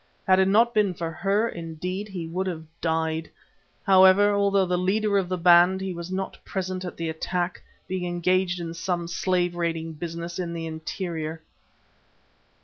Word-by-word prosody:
Had 190 Hz, 0 st, +5 dB
it 190 Hz, -, +4 dB
not 230 Hz, +4 st, +4 dB
been 205 Hz, -5 st, +2 dB
for 165 Hz, -1 st, -4 dB
her, 200 Hz, +7 st, +1 dB
indeed, 175 Hz, +3 st, -5 dB
he 185 Hz, -5 st, -5 dB
would 180 Hz, +4 st, -3 dB
have 160 Hz, -3 st, -4 dB, 0.2 s
died. 160 Hz, -1 st, -1 dB, 0.5 s
However, 190 Hz, +2 st, +6 dB
although 200 Hz, -1 st, +3 dB
the 180 Hz, 0 st, 0 dB
leader 200 Hz, +3 st, +1 dB
of 180 Hz, -2 st, -3 dB
the 185 Hz, -, -1 dB
band, 175 Hz, +2 st, +6 dB
he 190 Hz, -1 st, -3 dB
was 170 Hz, +1 st, -7 dB
not 190 Hz, +1 st, -4 dB
present 185 Hz, -1 st, -4 dB
at 180 Hz, -, -6 dB
the 165 Hz, -, -3 dB
attack, 175 Hz, +3 st, -2 dB, 0.3 s
being 185 Hz, -1 st, -3 dB
engaged 180 Hz, +1 st, +1 dB
in 165 Hz, -1 st, -5 dB
some 170 Hz, 0 st, -2 dB
slave 175 Hz, +1 st, 0 dB
raiding 165 Hz, -1 st, -2 dB
business 170 Hz, +2 st, -6 dB
in 170 Hz, -2 st, -3 dB
the 165 Hz, -1 st, -4 dB
interior. 160 Hz, 0 st, -5 dB
180 Hz, 165 wpm, -25 LUFS, 165-190 Hz, 0.5 s, However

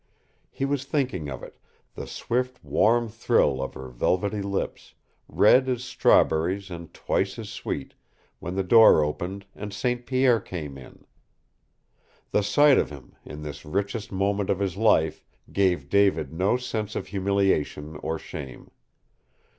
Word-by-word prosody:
He 135 Hz, -, -3 dB
was 140 Hz, -1 st, -1 dB
thinking 130 Hz, -, -2 dB
of 65 Hz, -, -7 dB
it, -, -, -12 dB, 0.3 s
the -, -, -7 dB
swift, 125 Hz, +1 st, -3 dB
warm 115 Hz, +2 st, +3 dB
thrill 110 Hz, -, +1 dB
of 65 Hz, -, -5 dB
her 65 Hz, -, -7 dB
velvety 95 Hz, -, 0 dB
lips, 100 Hz, 0 st, -4 dB, 0.3 s
red 130 Hz, +1 st, +4 dB
as 125 Hz, -1 st, -1 dB
strawberries 95 Hz, -4 st, +2 dB
and 85 Hz, -1 st, -8 dB
twice -, -, -1 dB
as -, -, -7 dB
sweet, -, -, -5 dB, 0.5 s
when 90 Hz, +2 st, -5 dB
the 95 Hz, -, 0 dB
door 110 Hz, -5 st, +7 dB
opened 90 Hz, +6 st, -4 dB
and 105 Hz, 0 st, -6 dB
St. 120 Hz, +4 st, -2 dB
Pierre 130 Hz, -3 st, +3 dB
came 80 Hz, -8 st, -7 dB
in. 65 Hz, -, -14 dB, 1.3 s
The -, -, +3 dB
sight 140 Hz, +7 st, +5 dB
of -, -, 0 dB
him, 70 Hz, -4 st, -12 dB
in 75 Hz, 0 st, -9 dB
this 75 Hz, -1 st, -7 dB
richest 100 Hz, +6 st, -3 dB
moment 100 Hz, +1 st, 0 dB
of 100 Hz, -, +2 dB
his 95 Hz, -3 st, -2 dB
life, 90 Hz, -8 st, +2 dB, 0.3 s
gave 90 Hz, -8 st, +1 dB
David 100 Hz, -5 st, +2 dB
no 95 Hz, +8 st, +1 dB
sense 110 Hz, -4 st, -4 dB
of -, -, -3 dB
humiliation 95 Hz, -6 st, 0 dB
or 80 Hz, +2 st, -3 dB
shame. 70 Hz, -4 st, -9 dB
100 Hz, 145 wpm, -25 LUFS, 80-115 Hz, 1.3 s, door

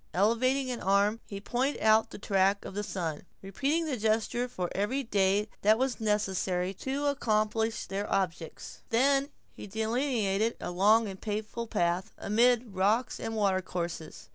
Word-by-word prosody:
Elevating 255 Hz, +7 st, +2 dB
an 240 Hz, -, -4 dB
arm, 200 Hz, +3 st, +2 dB
he 200 Hz, -, -6 dB
pointed 250 Hz, +7 st, -1 dB
out 220 Hz, 0 st, +4 dB
the -, -, -9 dB
track 195 Hz, 0 st, +1 dB
of -, -, -7 dB
the 205 Hz, -, -2 dB
sun, 170 Hz, -7 st, -4 dB, 0.2 s
repeating 280 Hz, -, 0 dB
the 285 Hz, -5 st, -2 dB
gesture 225 Hz, +3 st, 0 dB
for 185 Hz, -7 st, -3 dB
every 230 Hz, +8 st, -1 dB
day 200 Hz, -2 st, +2 dB
that 215 Hz, +2 st, +5 dB
was 260 Hz, -1 st, -1 dB
necessary 190 Hz, -3 st, 0 dB
to 270 Hz, +8 st, -3 dB
accomplish 220 Hz, -4 st, 0 dB
their 200 Hz, +1 st, -4 dB
objects. 180 Hz, -4 st, -3 dB
Then 275 Hz, +4 st, +3 dB, 0.2 s
he -, -, -9 dB
delineated 220 Hz, -1 st, 0 dB
a -, -, -4 dB
long 210 Hz, +5 st, +4 dB
and 190 Hz, -1 st, -8 dB
painful 215 Hz, +2 st, -4 dB
path, 175 Hz, +1 st, -1 dB
amid 235 Hz, +1 st, +2 dB
rocks 210 Hz, +6 st, +1 dB
and 225 Hz, -, -4 dB
water 195 Hz, -3 st, +2 dB
courses. 170 Hz, -3 st, -6 dB
215 Hz, 155 wpm, -29 LUFS, 195-240 Hz, 0.2 s, that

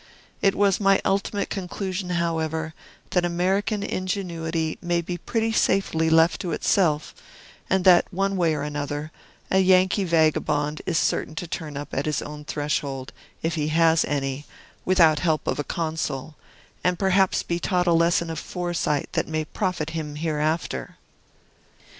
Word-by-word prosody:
It 195 Hz, 0 st, +3 dB
was 200 Hz, -2 st, +3 dB
my 195 Hz, -1 st, +4 dB
ultimate 200 Hz, +1 st, 0 dB
conclusion, 185 Hz, -1 st, -4 dB
however, 160 Hz, -2 st, -1 dB, 0.4 s
that 180 Hz, -, +2 dB
American 190 Hz, +4 st, 0 dB
ingenuity 170 Hz, -5 st, -2 dB
may 175 Hz, 0 st, 0 dB
be 175 Hz, +1 st, -4 dB
pretty 225 Hz, -1 st, -1 dB
safely 190 Hz, -6 st, +2 dB
left 165 Hz, +1 st, +4 dB
to 180 Hz, -4 st, -3 dB
itself, 155 Hz, -6 st, +1 dB, 0.6 s
and 190 Hz, -1 st, +2 dB
that, 180 Hz, 0 st, +6 dB
one 195 Hz, +1 st, 0 dB
way 170 Hz, -4 st, +2 dB
or 145 Hz, -, -3 dB
another, 145 Hz, +1 st, -4 dB, 0.4 s
a 190 Hz, -, +4 dB
Yankee 185 Hz, +1 st, +4 dB
vagabond 155 Hz, -3 st, +1 dB
is 160 Hz, -, +1 dB
certain 155 Hz, -, 0 dB
to 175 Hz, -, -4 dB
turn 155 Hz, -3 st, -5 dB
up 145 Hz, 0 st, -6 dB
at 140 Hz, +3 st, -1 dB
his 150 Hz, -, -1 dB
own 150 Hz, 0 st, -8 dB
threshold, 140 Hz, -3 st, -3 dB, 0.3 s
if 165 Hz, +1 st, 0 dB
he 155 Hz, -2 st, -1 dB
has 165 Hz, +1 st, +4 dB
any, 140 Hz, 0 st, -3 dB, 0.4 s
without 165 Hz, -5 st, +5 dB
help 160 Hz, -1 st, 0 dB
of -, -, -1 dB
a -, -, 0 dB
Consul, 155 Hz, -2 st, -3 dB, 0.5 s
and 180 Hz, -1 st, +2 dB
perhaps 190 Hz, 0 st, +2 dB
be 170 Hz, 0 st, -2 dB
taught 180 Hz, 0 st, +1 dB
a 170 Hz, -, +3 dB
lesson 170 Hz, 0 st, +2 dB
of 160 Hz, -, -4 dB
foresight 175 Hz, -5 st, -2 dB
that -, -, 0 dB
may 155 Hz, 0 st, -2 dB
profit 175 Hz, -3 st, -2 dB
him 155 Hz, -2 st, -4 dB
hereafter. 155 Hz, -, -2 dB
165 Hz, 155 wpm, -24 LUFS, 155-185 Hz, 0.6 s, that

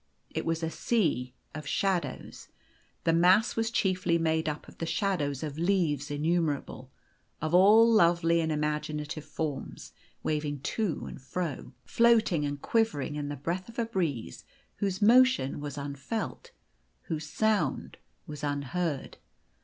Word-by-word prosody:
It -, -, -3 dB
was 165 Hz, 0 st, -1 dB
a 160 Hz, -, 0 dB
sea 145 Hz, -, 0 dB, 0.2 s
of 150 Hz, -1 st, -7 dB
shadows. 190 Hz, +2 st, -2 dB, 0.6 s
The 165 Hz, -, +3 dB
mass 185 Hz, +7 st, +4 dB
was 225 Hz, 0 st, 0 dB
chiefly 185 Hz, -6 st, +1 dB
made 160 Hz, -1 st, +1 dB
up 150 Hz, 0 st, -6 dB
of -, -, -15 dB
the 165 Hz, -, -3 dB
shadows 165 Hz, -6 st, -1 dB
of 150 Hz, 0 st, -5 dB
leaves 165 Hz, -6 st, +1 dB
innumera 155 Hz, 0 st, 0 dB
ble, 130 Hz, +1 st, -11 dB, 0.5 s
of 155 Hz, +1 st, -3 dB
all 210 Hz, +5 st, +7 dB
lovely 170 Hz, -6 st, +4 dB
and 160 Hz, -1 st, -1 dB
imaginative 150 Hz, 0 st, -2 dB
forms, 150 Hz, -4 st, -5 dB, 0.3 s
waving 150 Hz, -2 st, -2 dB
to 205 Hz, +4 st, -2 dB
and -, -, -9 dB
fro, 160 Hz, +3 st, -4 dB
floating 225 Hz, -9 st, +3 dB
and 145 Hz, 0 st, -3 dB
quivering 200 Hz, -, 0 dB
in 145 Hz, -1 st, -3 dB
the 145 Hz, -, -3 dB
breath 170 Hz, -, -4 dB
of 230 Hz, -, -13 dB
a 235 Hz, -, +1 dB
breeze 170 Hz, -, -3 dB, 0.3 s
whose 195 Hz, -1 st, -1 dB
motion 245 Hz, -, +5 dB
was 145 Hz, -1 st, -6 dB
unfelt, 145 Hz, -, -5 dB, 0.5 s
whose 155 Hz, -3 st, -4 dB
sound 210 Hz, -10 st, 0 dB, 0.3 s
was 150 Hz, -1 st, -8 dB
unheard. 145 Hz, +1 st, -2 dB
165 Hz, 140 wpm, -29 LUFS, 145-190 Hz, 0.6 s, all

